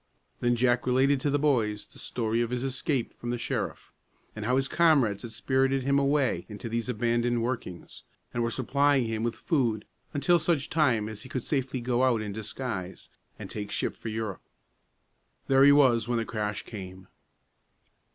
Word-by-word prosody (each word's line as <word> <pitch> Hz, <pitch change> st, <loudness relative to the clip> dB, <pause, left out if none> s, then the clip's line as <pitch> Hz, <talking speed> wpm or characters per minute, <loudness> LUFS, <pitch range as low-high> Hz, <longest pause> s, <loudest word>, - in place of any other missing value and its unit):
Then 120 Hz, 0 st, +2 dB
Jack 120 Hz, +1 st, +2 dB
related 135 Hz, +2 st, +3 dB
to 145 Hz, -, 0 dB
the 145 Hz, -, +2 dB
boys 115 Hz, -8 st, +1 dB
the -, -, -14 dB
story 115 Hz, -1 st, -1 dB
of 120 Hz, -, -1 dB
his 125 Hz, 0 st, -2 dB
escape 135 Hz, -1 st, -1 dB
from 120 Hz, -, -5 dB
the 120 Hz, -, -1 dB
sheriff, -, -, -4 dB, 0.4 s
and 110 Hz, -1 st, -5 dB
how 125 Hz, +3 st, +2 dB
his 135 Hz, 0 st, +1 dB
comrades 140 Hz, -13 st, +3 dB
had 120 Hz, -, -7 dB
spirited 135 Hz, +3 st, +1 dB
him 140 Hz, +1 st, +3 dB
away 140 Hz, -1 st, +1 dB
into 105 Hz, +2 st, -7 dB
these 115 Hz, +1 st, -2 dB
abandoned 120 Hz, 0 st, +1 dB
workings, 115 Hz, -8 st, -5 dB, 0.3 s
and 120 Hz, -, -1 dB
were 115 Hz, -, +1 dB
supplying 140 Hz, +1 st, +2 dB
him 110 Hz, -1 st, -2 dB
with 120 Hz, 0 st, -1 dB
food 120 Hz, -9 st, 0 dB, 0.3 s
until 170 Hz, +5 st, +3 dB
such 155 Hz, -3 st, 0 dB
time 125 Hz, -9 st, +2 dB
as 110 Hz, -1 st, -6 dB
he 130 Hz, -, -11 dB
could 130 Hz, -2 st, -3 dB
safely 130 Hz, -3 st, -1 dB
go 125 Hz, 0 st, 0 dB
out 130 Hz, -3 st, +3 dB
in 105 Hz, -1 st, -5 dB
disguise, 110 Hz, -3 st, -5 dB, 0.3 s
and -, -, -8 dB
take 105 Hz, -1 st, -5 dB
ship -, -, -2 dB
for -, -, -9 dB
Europe. 110 Hz, -3 st, -4 dB, 1.1 s
There 135 Hz, 0 st, +5 dB
he 145 Hz, -, +8 dB
was 125 Hz, -6 st, +4 dB
when 120 Hz, -1 st, 0 dB
the 115 Hz, -, -1 dB
crash 105 Hz, -2 st, -3 dB
came. 95 Hz, -3 st, -9 dB
120 Hz, 180 wpm, -28 LUFS, 110-135 Hz, 1.1 s, he